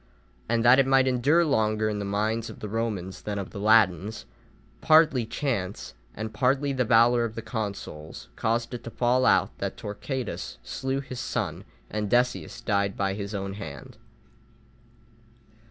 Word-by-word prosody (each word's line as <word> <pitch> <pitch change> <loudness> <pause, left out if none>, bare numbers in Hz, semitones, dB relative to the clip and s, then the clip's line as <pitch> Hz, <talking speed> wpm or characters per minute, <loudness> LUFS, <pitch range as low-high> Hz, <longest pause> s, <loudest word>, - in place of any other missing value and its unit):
And 115 0 +1
that 125 +3 +7
it 135 - +4
might 135 -1 +5
endure 140 +7 +3
longer 110 -6 +1
in 105 -1 -2
the 100 - -3
minds 110 +3 -1
of - - -10
the 105 - -5
Romans 105 -4 -3
than 105 -1 -4
of 100 -2 -5
the - - -7
Latins, 105 -1 +3 0.6
partly 155 -7 +5
chance, 105 - -3 0.2
and 110 +1 -5
partly 135 +4 +1
the 130 -1 +1
valour 120 +1 +4
of 115 -2 -4
the 115 - -5
consuls 100 -10 -6
caused 115 +2 -1
it 120 - -6
to - - -4
fall 125 +2 +2
out - - +3
that - - -3
Torquatus 125 - -5
slew 135 - -3
his 130 -2 -7
son, - - -3 0.2
and 105 -1 -3
Decius 120 -8 0
died 100 -1 0
by 95 -1 0
his 100 +1 -5
own 100 -1 -3
hand. 110 +4 -9
115 Hz, 160 wpm, -26 LUFS, 100-125 Hz, 0.6 s, that